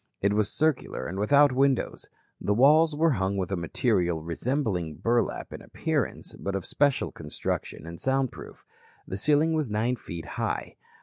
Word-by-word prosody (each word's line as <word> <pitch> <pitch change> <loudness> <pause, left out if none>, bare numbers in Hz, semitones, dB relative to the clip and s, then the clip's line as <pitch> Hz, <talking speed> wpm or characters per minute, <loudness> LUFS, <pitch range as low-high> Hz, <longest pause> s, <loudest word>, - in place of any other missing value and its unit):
It 100 +1 +2
was 105 -1 +1
circular 155 -2 0
and 95 +3 -4
without 140 +7 +5
windows. 135 0 0 0.3
The 105 - 0
walls 150 +5 +5
were 160 +2 +3
hung 95 -5 0
with 95 0 -2
a - - +1
material 85 -1 0
resembling 90 - -2
burlap 120 +5 0
in - - -8
appearance, - - -3
but 100 0 -3
of 95 - -3
special 140 -2 +1
construction 75 +1 -4
and 85 0 -8
sound 135 -1 +1
proof. - - -12 0.4
The - - -4
ceiling 150 +8 +3
was 155 -6 0
nine 115 +4 0
feet 85 -6 -7
high. - - -3
115 Hz, 165 wpm, -27 LUFS, 95-140 Hz, 0.4 s, without